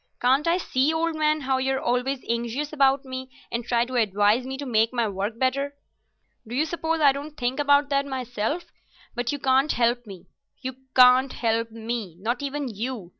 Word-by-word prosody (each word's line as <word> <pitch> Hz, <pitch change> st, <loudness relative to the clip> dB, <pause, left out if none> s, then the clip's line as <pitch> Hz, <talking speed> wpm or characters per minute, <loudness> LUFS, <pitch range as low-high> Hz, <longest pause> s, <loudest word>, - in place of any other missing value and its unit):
Can't 265 Hz, +5 st, +2 dB
I 340 Hz, +1 st, +3 dB
see, 280 Hz, -4 st, +1 dB
old 325 Hz, +1 st, 0 dB
man, 305 Hz, 0 st, +1 dB
how 265 Hz, -1 st, 0 dB
you're 265 Hz, 0 st, 0 dB
always 250 Hz, +2 st, -1 dB
anxious 235 Hz, +6 st, -2 dB
about 275 Hz, -1 st, +3 dB
me, 260 Hz, 0 st, -6 dB, 0.2 s
and 235 Hz, +1 st, -2 dB
try 235 Hz, 0 st, +1 dB
to 255 Hz, 0 st, -3 dB
advise 210 Hz, +3 st, +2 dB
me 265 Hz, 0 st, -4 dB
to 285 Hz, -, -6 dB
make 225 Hz, -3 st, +2 dB
my 235 Hz, -3 st, 0 dB
work 200 Hz, +3 st, -3 dB
better? 275 Hz, +3 st, 0 dB, 0.7 s
Do 235 Hz, -, -5 dB
you 300 Hz, +4 st, +2 dB
suppose 325 Hz, 0 st, -2 dB
I 290 Hz, -3 st, +6 dB
don't 290 Hz, +2 st, -7 dB
think 250 Hz, +2 st, -1 dB
about 285 Hz, 0 st, +4 dB
that 280 Hz, 0 st, +1 dB
myself? 255 Hz, +4 st, -3 dB, 0.5 s
But 245 Hz, 0 st, -2 dB
you 290 Hz, -, -2 dB
can't 270 Hz, +2 st, +2 dB
help 240 Hz, 0 st, +1 dB
me—you 200 Hz, +7 st, -10 dB, 0.2 s
can't 255 Hz, +1 st, +6 dB
help 230 Hz, 0 st, 0 dB
me—not 225 Hz, -, -4 dB
even 285 Hz, 0 st, -3 dB
you. 220 Hz, -3 st, -5 dB
260 Hz, 180 wpm, -25 LUFS, 235-280 Hz, 0.7 s, I